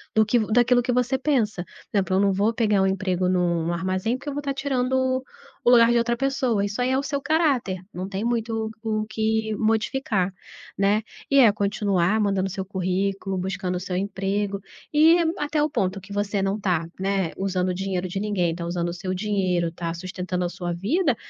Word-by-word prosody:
Do 220 0 +5
que 235 +3 +2
vo 215 - -1
daquilo 245 +2 +4
que 245 - -1
você 250 +1 +1
pensa. 235 -10 0 0.3
Exemplo: 190 -2 +1
"eu - - +3
não 200 -1 +3
vou 205 +4 +2
pegar 210 -4 +2
um 190 - +3
emprego 185 -1 0
num 170 -2 +1
armazém, 185 +7 -1
porque 275 - -14
eu - - -4
vou 290 - -3
tá 280 -1 -2
tirando 260 -1 0 0.4
o - - +4
lugar 235 -1 +7
de 240 - +3
outra 235 0 0
pessoa." 260 -5 +1
Isso 205 +4 -3
aí 250 - +1
é 260 - +2
o 275 - -1
seu 280 -1 -2
caráter, 275 - +1
não 185 +2 -5
tem 195 +2 -3
muito 225 -2 -1
o 215 -1 -1
que 220 0 -1
modificar, 215 -3 0 0.4
né. 200 +2 +2 0.3
E 280 - +3
é 235 -5 +7
continuar 200 -1 +1
mandando 195 -2 +1
seu 190 0 -4
currículo, 190 +1 -2
buscando 185 0 -2
o - - -1
seu 180 0 -4
emprego 200 +1 -1 0.3
e 315 +3 +6 0.2
até 295 0 0
o 300 - +2
ponto 190 -6 -1
que 195 +2 -14
você 205 0 -1
não 195 +2 0
tá, 175 -4 0
né, 195 -3 0
usando 185 -1 0
o 180 - 0
dinheiro 185 -1 -2
de 185 +2 -4
ninguém, 190 -5 0
tá 170 0 -5
usando 175 0 -2
o - - -4
seu 185 +1 -4
dinheiro, 185 -4 0
tá 170 0 -4
sustentando 180 +1 -3
a 175 - -1
sua 175 -1 -4
vida, 265 - +1
200 Hz, 205 wpm, -24 LUFS, 185-235 Hz, 0.4 s, lugar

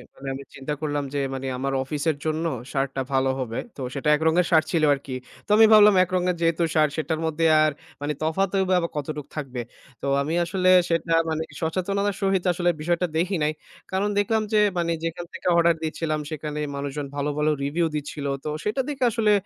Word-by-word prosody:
মানি 135 - -10
আমি 135 +1 -7
চিন্তা 135 +2 -4
করলাম, 145 -2 -1
যে, 145 - 0
মানি 135 0 -4
আমার 135 +1 -2
অফিসের 150 +2 -1
জন্য 160 +1 -1 0.3
শার্টটা 135 -1 -1
ভালো 135 0 +2
হবে। 115 -3 -3 0.2
তো - - -6
সেটা 140 +1 -3
এক 150 - -5
রঙের 170 +2 +3
শার্ট 160 -2 +5
ছিল 165 -2 +1
আরকি। 135 -1 -5 0.3
তো - - -27
আমি 225 - +8
ভাবলাম 210 -1 +8
এক 185 - -5
রঙের 180 0 +1
যেহেতু 165 0 +2
শার্ট 155 -1 +4
সেটার 155 0 -1
মধ্যে 160 +1 0 0.2
আর 155 - +3 0.3
মানি 145 +1 -1
তফাৎ 160 +5 +1 0.2
বা 185 - +4 0.2
কতটুকু 150 0 -4
থাকবে। 130 -4 -4 0.4
তো - - -5 0.2
আমি 150 +3 -2
আসলে 185 +1 +1 0.2
সেটা 165 0 0 0.2
মানি 160 0 -1 0.2
সচেতনতার 195 +4 -1
সহিত 195 -2 +1
আসলে 175 0 +1
বিষয়টা 175 +2 0
দেখি 185 +4 +1
নাই। 150 - +2 0.4
কারণ 195 +2 0
দেখলাম 220 +2 +1
যে, - - +5 0.2
মানি 170 -1 0
যেখান 165 +1 -3
থেকে - - -6
অর্ডার 170 0 +4
দিচ্ছিলাম, 155 -1 -2
সেখানে 150 -1 -4 0.2
মানুষজন 140 +1 -4
ভালো, 145 +1 -1
ভালো 150 +1 +2
রিভিউ 155 +5 0
দিচ্ছিল। 145 0 -4 0.2
তো - - -3
সেটা 215 +6 0
দেখে 275 -3 -3
আসলে 215 -2 +2
160 Hz, 195 wpm, -24 LUFS, 145-180 Hz, 0.4 s, আমি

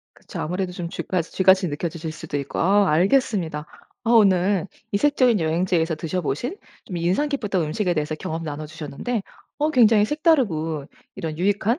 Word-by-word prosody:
그쵸. - - -8
아무래도 180 +2 -2
좀 175 -1 -5
쥐파지 170 -1 -3
쥐같이 190 -1 +4
느껴지실 160 +1 -4
수도 155 -2 -6
있고 140 -1 -5
아 200 +3 +4
알겠습니다. 175 - +1 0.4
아 230 - 0
오늘 195 -3 +4 0.3
이색적인 250 -1 +3
여행지에서 165 +1 +1
드셔 165 +3 -3
보신 175 - -3 0.3
좀 180 - -6
인상 180 - +1
깊었던 210 - -1
음식에 180 +4 -1
대해서 150 0 -1
경험 160 +1 -5
나눠 155 -1 -5
주셨는데 165 - -4 0.4
어 305 +1 +1
굉장히 225 -5 +5
색다르고 200 - +1 0.3
이런 160 -1 -5
유익한 205 - +1
180 Hz, 385 characters per minute, -23 LUFS, 160-210 Hz, 0.4 s, 굉장히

